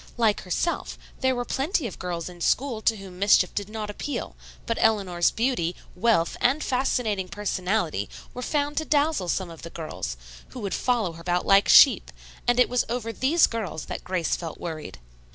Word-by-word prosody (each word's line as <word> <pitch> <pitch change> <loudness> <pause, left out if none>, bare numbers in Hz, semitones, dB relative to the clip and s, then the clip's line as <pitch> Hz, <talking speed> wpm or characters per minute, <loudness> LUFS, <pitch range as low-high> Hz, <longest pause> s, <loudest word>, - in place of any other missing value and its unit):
Like 220 -3 +2
herself, 265 - -2 0.2
there 260 -1 +2
were 245 0 -2
plenty 295 - -1
of 210 - -6
girls 175 -2 -4
in 175 -1 -11
school 245 +3 +1
to 225 0 +2
whom 190 -2 -11
mischief 195 -2 +4
did 205 0 -3
not 215 -1 -4
appeal, 285 +7 -5 0.3
but 230 - -1
Eleanor's 195 -6 +3
beauty, 225 -8 0 0.2
wealth 180 -4 +2
and 265 +5 +2
fascinating 240 -7 0
personality 185 - -1 0.2
were 250 - -6
found 290 +2 -1
to 315 - 0
dazzle 295 - +1
some 185 -2 -1
of 165 - -11
the 170 - -8
girls, 155 - -5 0.3
who 255 - -9
would 200 -2 -3
follow 235 -8 +1
her 165 0 -11
about 175 +1 0
like 195 0 +5
sheep, 275 - +7 0.4
and 245 0 +3
it 250 - +6
was 250 0 +1
over 230 -1 -3
these 305 +8 +4
girls 215 -9 -4
that - - -6
Grace 180 -3 0
felt 165 -3 -7
worried. 155 - -6
210 Hz, 185 wpm, -25 LUFS, 180-250 Hz, 0.4 s, sheep